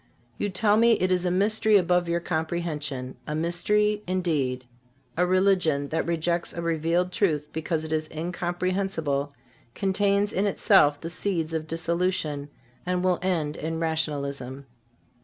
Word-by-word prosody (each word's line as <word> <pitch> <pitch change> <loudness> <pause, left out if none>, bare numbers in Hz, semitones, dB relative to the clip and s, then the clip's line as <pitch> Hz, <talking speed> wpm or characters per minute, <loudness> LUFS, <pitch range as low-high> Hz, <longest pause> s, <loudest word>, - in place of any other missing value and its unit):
You 205 - 0
tell 205 +2 +2
me 230 +1 +5
it 185 -3 +1
is 180 0 +1
a - - +2
mystery 210 +3 +3
above 180 -1 +2
your 170 0 +1
comprehension. 160 -6 -3
A 150 - -2
mystery, 210 +6 +1
indeed. 150 -9 -1 0.5
A 180 +1 +2
religion 180 -7 +2
that 160 - -1
rejects 170 +1 -1
a 170 - -4
revealed 170 +2 0
truth 155 -9 0
because 160 0 -2
it 160 0 -4
is 155 0 -1
incomprehensible 175 -3 -2 0.4
contains 200 +1 +1
in 200 +2 +1
itself 145 -6 +4
the 165 - -6
seeds 170 -4 -2
of 160 -1 -2
dissolution 165 -3 -1 0.3
and 180 0 -1
will 185 -1 +2
end 165 -5 -1
in 160 +1 -4
rationalism. 140 -4 -2
170 Hz, 140 wpm, -26 LUFS, 155-185 Hz, 0.5 s, me